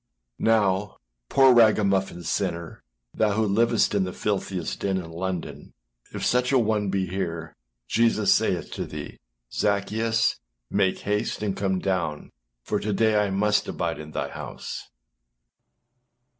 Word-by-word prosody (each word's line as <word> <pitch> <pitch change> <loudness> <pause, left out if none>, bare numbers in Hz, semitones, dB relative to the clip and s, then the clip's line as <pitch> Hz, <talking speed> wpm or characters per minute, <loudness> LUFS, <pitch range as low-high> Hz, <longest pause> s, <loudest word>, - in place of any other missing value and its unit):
Now, 105 -3 +2 0.3
poor 135 -1 +6
ragamuffin 100 -6 +3
sinner, 85 +1 -3 0.3
thou 105 -2 +2
who 110 +1 +1
livest 115 +3 +2
in 100 -2 +2
the 90 - -3
filthiest 95 -3 -2
den 95 -1 0
in 85 -3 -6
London, 90 +1 -5 0.4
if - - -4
such 125 +1 +2
an 130 -4 +4
one 105 -2 0
be 95 0 0
here, 85 -4 -4 0.3
Jesus 115 -2 +3
saith - - 0
to - - -4
thee, - - -8 0.3
âZaccheus, 110 +3 +1 0.3
make 95 -2 +1
haste 105 +1 -1
and 100 -2 -1
come 95 -1 0
down; 90 -5 -2 0.3
for - - -1
to 105 - -2
day 110 +1 +3
I 100 - -1
must 105 +2 +1
abide 85 -1 -2
in 75 0 -8
thy - - -3
house. - - -7
100 Hz, 140 wpm, -25 LUFS, 95-110 Hz, 0.4 s, poor